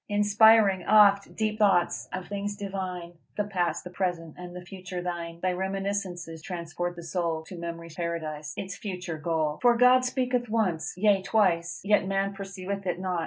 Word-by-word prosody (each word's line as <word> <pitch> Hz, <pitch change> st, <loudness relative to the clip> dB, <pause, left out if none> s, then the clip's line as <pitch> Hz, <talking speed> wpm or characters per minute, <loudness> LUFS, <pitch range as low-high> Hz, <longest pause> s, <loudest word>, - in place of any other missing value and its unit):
Inspiring 205 Hz, -1 st, +5 dB
oft 200 Hz, -1 st, +5 dB
deep 215 Hz, 0 st, -1 dB
thoughts 190 Hz, -5 st, +2 dB
of 185 Hz, -1 st, -5 dB
things 205 Hz, 0 st, -3 dB
divine: 185 Hz, -4 st, -5 dB, 0.2 s
The 210 Hz, -, +2 dB
past, 185 Hz, -4 st, -1 dB
the 180 Hz, -, -8 dB
present, 175 Hz, -4 st, -2 dB
and 180 Hz, 0 st, -9 dB
the 180 Hz, 0 st, -8 dB
future 185 Hz, -1 st, -7 dB
thine. 170 Hz, -1 st, -5 dB
Thy 185 Hz, -, +1 dB
reminiscences 190 Hz, -3 st, -3 dB
transport 175 Hz, 0 st, -4 dB
the 170 Hz, -, -9 dB
soul 165 Hz, -2 st, -2 dB
To 180 Hz, -, -10 dB
memory's 170 Hz, -1 st, -7 dB
Paradise 155 Hz, -3 st, -4 dB
its 195 Hz, -1 st, -5 dB
future 180 Hz, -5 st, -5 dB
goal. 155 Hz, -2 st, -1 dB
"_For 240 Hz, -1 st, +5 dB
God 250 Hz, +1 st, +6 dB
speaketh 250 Hz, -2 st, 0 dB
once, 200 Hz, -9 st, 0 dB
yea 200 Hz, 0 st, +4 dB
twice, 180 Hz, -5 st, +1 dB
yet 205 Hz, -1 st, +3 dB
man 195 Hz, 0 st, 0 dB
perceiveth 195 Hz, 0 st, -5 dB
it 175 Hz, -, 0 dB
not. 185 Hz, -2 st, -1 dB
185 Hz, 165 wpm, -27 LUFS, 170-200 Hz, 0.2 s, God